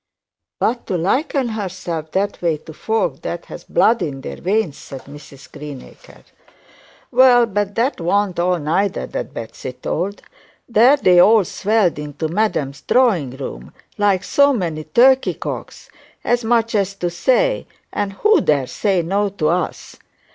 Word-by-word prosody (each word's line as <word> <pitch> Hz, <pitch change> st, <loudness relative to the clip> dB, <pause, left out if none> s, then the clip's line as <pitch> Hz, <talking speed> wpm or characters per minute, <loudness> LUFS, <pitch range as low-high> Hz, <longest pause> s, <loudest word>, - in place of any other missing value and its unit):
'But 240 Hz, +1 st, -1 dB
to 185 Hz, -, -1 dB
liken 255 Hz, -, 0 dB
herself 185 Hz, -7 st, -5 dB
that 200 Hz, +2 st, -1 dB
way 165 Hz, -3 st, +1 dB
to 160 Hz, +1 st, -12 dB
folk 220 Hz, +7 st, -2 dB
that -, -, -5 dB
ha' -, -, -9 dB
blood 230 Hz, +1 st, +3 dB
in 135 Hz, -3 st, -4 dB
their -, -, -7 dB
veins,' 190 Hz, -5 st, -1 dB
said 135 Hz, -1 st, -10 dB
Mrs 140 Hz, -1 st, -14 dB
Greenacre. 145 Hz, -3 st, -11 dB, 0.9 s
'Well, 250 Hz, -1 st, +6 dB
but 205 Hz, -2 st, -2 dB
that 235 Hz, -3 st, 0 dB
warn't 190 Hz, +1 st, 0 dB
all 180 Hz, +1 st, +2 dB
neither 170 Hz, +6 st, -1 dB
that -, -, -5 dB
Betsey 115 Hz, +3 st, -7 dB
told. 185 Hz, +9 st, -4 dB, 0.4 s
There 240 Hz, +5 st, +5 dB
they 180 Hz, -9 st, +4 dB
all 215 Hz, +2 st, +6 dB
swelled 200 Hz, -4 st, +1 dB
into 150 Hz, +1 st, -4 dB
madam's 160 Hz, -7 st, -1 dB
drawing 180 Hz, -, +2 dB
room, 65 Hz, -, -8 dB, 0.2 s
like 200 Hz, -2 st, +2 dB
so 280 Hz, +7 st, +4 dB
many 165 Hz, -, -3 dB
turkey 260 Hz, +10 st, +4 dB
cocks, -, -, -7 dB, 0.3 s
as 240 Hz, 0 st, +1 dB
much 230 Hz, 0 st, +1 dB
to 195 Hz, -4 st, -1 dB
say, -, -, +1 dB, 0.3 s
"and 205 Hz, -1 st, -2 dB
who 425 Hz, -, +3 dB
dare 140 Hz, -, +2 dB
say 190 Hz, -, 0 dB
no 200 Hz, +4 st, 0 dB
to 180 Hz, -6 st, -1 dB
us?" 175 Hz, +1 st, -3 dB
195 Hz, 145 wpm, -19 LUFS, 160-225 Hz, 0.9 s, Well